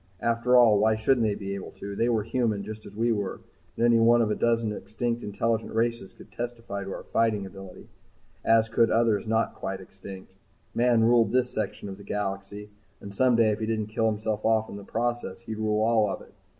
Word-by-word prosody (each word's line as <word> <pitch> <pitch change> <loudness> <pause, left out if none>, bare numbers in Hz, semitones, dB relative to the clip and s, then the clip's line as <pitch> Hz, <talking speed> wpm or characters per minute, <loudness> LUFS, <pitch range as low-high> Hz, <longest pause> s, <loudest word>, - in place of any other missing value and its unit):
After 115 +2 +3
all, 110 -4 +6
why 110 +1 +3
shouldn't 115 +1 +2
they 105 - 0
be 100 -1 -5
able 100 -1 -6
to? 100 0 -7
They 115 +4 +1
were 110 -3 +1
human, 115 -3 -1
just 110 +1 -8
as 100 - -13
we 115 +2 +1
were, 100 -3 -2 0.4
and 115 - +2
any 120 -1 +5
one 120 +1 +5
of 105 - 0
a - - +1
dozen 115 -2 +1
extinct 115 +3 -3
intelligent 110 +2 -2
races 115 -3 -1
could - - -16
testify 115 -4 -5
to 95 - -6
our - - -6
fighting 110 -3 0
ability, 95 -1 -11 0.6
as 115 0 +4
could 115 0 +3
others 115 -2 +2
not 115 +1 +1
quite 95 0 -5
extinct. 95 0 -11 0.4
Man 120 -1 +3
ruled 115 0 +4
this 125 0 +1
section 105 -1 -4
of 95 -1 -7
the - - -11
galaxy, 100 +1 -4 0.3
and 100 - -9
someday 115 -1 +3
if 105 - -2
he 110 - -2
didn't 110 -1 -2
kill 115 -1 +2
himself 110 0 -2
off 110 0 +2
in - - -7
the 100 - -9
process 115 -2 -3
he'd 110 -2 -6
rule 110 0 +1
all 110 -2 +3
of - - -4
it. - - -19
110 Hz, 215 wpm, -27 LUFS, 100-115 Hz, 0.6 s, all